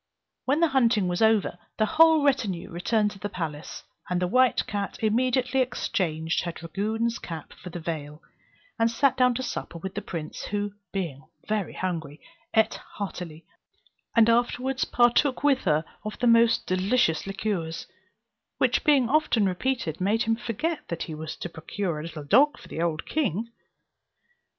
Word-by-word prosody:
When 285 +5 +2
the 335 - +4
hunting 235 -7 +3
was 175 +2 -1
over, 220 -5 +3 0.2
the 215 - +3
whole 320 +2 +5
retinue 245 -11 0
returned 210 +5 +1
to 195 - -12
the 205 +2 -4
palace; 160 -5 -5 0.3
and 180 -1 +1
the 180 - +1
white 255 +7 +3
cat 200 -1 -3
immediately 250 +3 +2
exchanged 175 -10 -1
her 175 - -2
dragoon's 220 +8 -2
cap 165 -2 -7
for 180 - -10
the 175 - -6
veil, 150 -2 -5 0.6
and 230 0 +4
sat 260 +3 +2
down 250 -1 +3
to 260 - -2
supper 240 -7 -5
with 190 +3 -6
the - - -3
prince, 160 -4 -6
who, 205 -1 -2 0.2
being 155 -7 -4 0.2
very 215 -2 -1
hungry, 160 -5 -4 0.4
ate 220 0 +3 0.2
heartily, 175 -5 -6 0.7
and 230 -2 +6
afterwards 245 +2 +1
partook 245 +3 +3
with 275 -4 +3
her 155 -2 +2 0.2
of 215 0 -5
the 245 - -1
most 230 -1 +5
delicious 185 -2 +1
liqueurs, 195 -5 -3 0.7
which - - +2
being 280 -5 +4
often 270 -6 +3
repeated 190 - -1
made 210 +5 +2
him 225 0 +1
forget 270 +9 -2
that 170 -1 -3
he 160 - -6
was 155 0 -6
to - - -5
procure 170 0 -4
a - - -4
little 160 -1 -7
dog 275 - +5
for - - -14
the 165 - -4
old 165 -2 -1
king. 230 - -1
210 Hz, 165 wpm, -26 LUFS, 170-245 Hz, 0.7 s, and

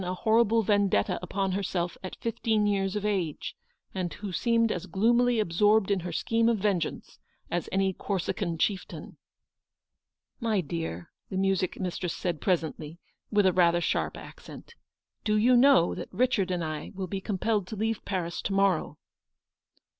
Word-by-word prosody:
ISO 180 - -4
a - - -1
horrible 225 +2 +3
vendetta 200 - +2
upon 190 +2 -2
herself 180 -2 -2
at 185 - -6
fifteen 220 -2 0
years 195 -1 0
of 210 0 -2
age, 185 -8 -2 0.4
and 180 -3 -2
who 205 -2 -6
seemed 230 +3 +2
as 180 +1 -4
gloomily 235 +6 +3
absorbed 205 +2 +3
in 200 - +2
her 175 0 -5
scheme 230 +7 +1
of 230 - +2
vengeance 190 -5 -2 0.3
as 175 0 -2
any 190 0 +1
Corsican 185 -2 -2
chieftain? 190 +3 -2
m - - -16 1.2
My 225 -4 +1
dear," 160 - -4 0.2
the 190 - -3
music 190 -1 0
mistress 180 -1 -3
said 170 -5 -3
presently, 160 -3 -1 0.3
with 205 -2 +3
rather 175 -1 +4
a - - +1
sharp 175 - -1
accent, - - -12 0.3
" - - -59
do 215 -1 +2
you 245 +4 +5
know 255 -7 +5
that - - -6
Richard 240 -7 +1
and 180 -2 -1
I 155 -1 -5
will 190 0 -3
be 190 +2 -4
compelled 205 0 -1
to 215 - -6
leave 220 +1 -2
Paris 175 -3 -3
to 195 - -3
morrow? 195 -4 +1
195 Hz, 165 wpm, -28 LUFS, 175-215 Hz, 1.2 s, you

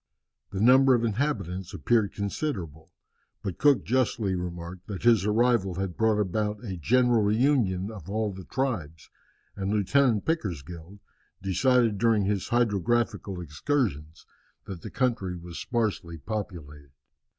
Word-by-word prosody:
The 95 - -5
number 130 +4 +6
of 120 - 0
inhabitants 100 - -2
appeared 100 +6 +2
considerable. 95 - -4 0.5
But 95 -4 -4
Cook 145 -3 +4
justly 120 -5 +1
remarked 90 0 -6
that 100 -3 -6
his 115 -4 +4
arrival 110 -4 +2
had 95 -2 -3
brought 110 -1 +2
about 105 +2 -1
a 95 -4 -4
general 120 - +3
reunion 105 -3 +1
of 95 -5 -10
all 105 0 -1
the 95 -1 -9
tribes, 90 - -3 0.4
and 95 0 -3
Lieutenant 110 +2 +2
Pickersgill 90 - -4 0.4
decided 110 +3 +2
during 115 -4 +3
his 100 -1 -1
hydrographical 120 -3 0
excursions 80 - -2 0.4
that 90 -4 -7
the - - -7
country 115 -8 -1
was 85 0 -8
sparsely 105 -8 -2
populated. 75 -7 -7
100 Hz, 130 wpm, -27 LUFS, 90-120 Hz, 0.5 s, number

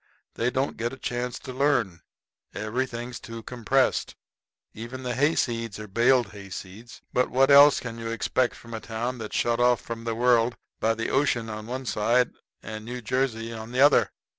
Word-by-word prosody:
They 120 - 0
don't 130 +2 -1
get 120 +2 -2
a - - -8
chance 125 -1 -3
to 130 - -8
learn. 125 - +1 0.5
Everything's 120 +2 -3
too 115 -1 -9
compressed. 125 +3 0 0.6
Even 115 +4 -7
the 125 -1 -2
hayseeds 120 -5 0
are 105 0 -7
baled 120 +2 +3
hayseeds. 100 +2 -10
But 125 - +2
what 135 +2 +3
else 145 +1 +8
can 115 -1 -7
you 115 - -5
expect 120 +2 0
from 115 -1 -12
a 110 - -3
town 120 +3 -4
that's 110 -1 -6
shut 120 0 +1
off 125 -1 +4
from 115 0 -7
the 115 -1 -1
world 120 0 +3 0.2
by 115 0 +2
the 115 - -2
ocean 120 -5 +1
on 110 0 -7
one 130 +2 -4
side 120 +2 +2 0.3
and 110 +1 -7
New 125 +2 -6
Jersey 115 -2 -1
on 110 +1 -8
the 130 - +2
other? 145 +1 +6
120 Hz, 180 wpm, -26 LUFS, 115-125 Hz, 0.6 s, else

